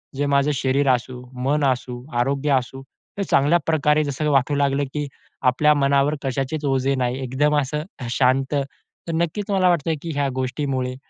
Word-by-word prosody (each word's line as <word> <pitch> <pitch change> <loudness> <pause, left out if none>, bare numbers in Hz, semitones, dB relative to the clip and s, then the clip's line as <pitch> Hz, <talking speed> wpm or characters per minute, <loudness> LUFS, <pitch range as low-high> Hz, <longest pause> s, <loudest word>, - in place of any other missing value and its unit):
जे 145 +2 0
माझं 140 +1 +2
शरीर 135 +1 +1
असू, 125 +1 -7 0.2
मन 145 +3 +1
असू, 125 -1 -5
आरोग्य 140 +4 0
असू 135 +1 -9 0.3
तर 200 - -1
चांगल्या 150 +5 +4
प्रकारे 155 -1 +2
जसं 150 +1 -2
वाटू 140 +1 +2
लागलं, 140 0 +1
की 150 -1 -2 0.3
आपल्या 140 +4 +4
मनावर 140 +1 +2
कशाचेच 135 +3 -2
ओझे 135 0 +1
नाही. 125 0 -1
एकदम 145 +4 +1
असं 150 +3 -3 0.2
अ, 125 - -5
शांत. 130 +3 +1
तर 140 +4 -6
नक्कीच 170 +5 -2
मला 185 -2 +3
वाटतंय, 165 -2 +1
की 165 - -4
ह्या 140 -1 0
गोष्टीमुळे 130 -1 -2
140 Hz, 170 wpm, -22 LUFS, 130-150 Hz, 0.3 s, चांगल्या